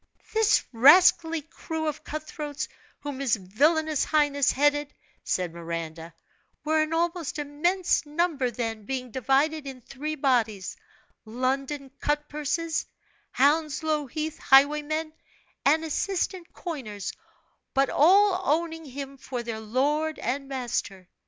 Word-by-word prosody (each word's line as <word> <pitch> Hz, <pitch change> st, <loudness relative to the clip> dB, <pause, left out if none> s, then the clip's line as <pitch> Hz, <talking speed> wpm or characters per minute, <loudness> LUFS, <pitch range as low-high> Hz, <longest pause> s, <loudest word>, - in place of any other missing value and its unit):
"This 440 Hz, -1 st, +4 dB
rascally 320 Hz, +5 st, +6 dB
crew 320 Hz, +1 st, -5 dB
of 305 Hz, 0 st, -3 dB
cut 310 Hz, 0 st, -5 dB
throats, 295 Hz, -1 st, -5 dB, 0.3 s
whom 285 Hz, -2 st, -5 dB
his 270 Hz, -5 st, +2 dB
villainous 295 Hz, -, +1 dB
highness 290 Hz, -3 st, +2 dB
headed," 290 Hz, +1 st, +1 dB, 0.3 s
said 180 Hz, -3 st, -1 dB
Miranda, 165 Hz, -1 st, -6 dB, 0.5 s
"were 310 Hz, +1 st, +2 dB
an 310 Hz, 0 st, -1 dB
almost 335 Hz, -1 st, -1 dB
immense 325 Hz, +6 st, +1 dB
number 300 Hz, -3 st, 0 dB
then, 225 Hz, -3 st, -4 dB
being 255 Hz, -1 st, -4 dB
divided 275 Hz, +5 st, +1 dB
in 265 Hz, -2 st, -7 dB
three 290 Hz, +5 st, -5 dB
bodies 235 Hz, -9 st, 0 dB, 0.5 s
London 265 Hz, +4 st, -2 dB
cut 295 Hz, 0 st, 0 dB
purses, 305 Hz, +2 st, -2 dB, 0.4 s
Hounslow 300 Hz, +1 st, +1 dB
Heath 310 Hz, +3 st, -4 dB
highwaymen, 300 Hz, +3 st, +3 dB, 0.5 s
and 315 Hz, +3 st, +4 dB
assistant 360 Hz, +2 st, -2 dB
coiners, 215 Hz, -, -6 dB, 0.6 s
but 270 Hz, 0 st, +3 dB
all 380 Hz, +4 st, +5 dB
owning 325 Hz, 0 st, 0 dB
him 275 Hz, 0 st, -7 dB
for 250 Hz, -2 st, -5 dB
their 230 Hz, -2 st, -4 dB
lord 290 Hz, +8 st, 0 dB
and 275 Hz, +3 st, -3 dB
master. 240 Hz, -8 st, -3 dB
290 Hz, 120 wpm, -26 LUFS, 255-315 Hz, 0.6 s, rascally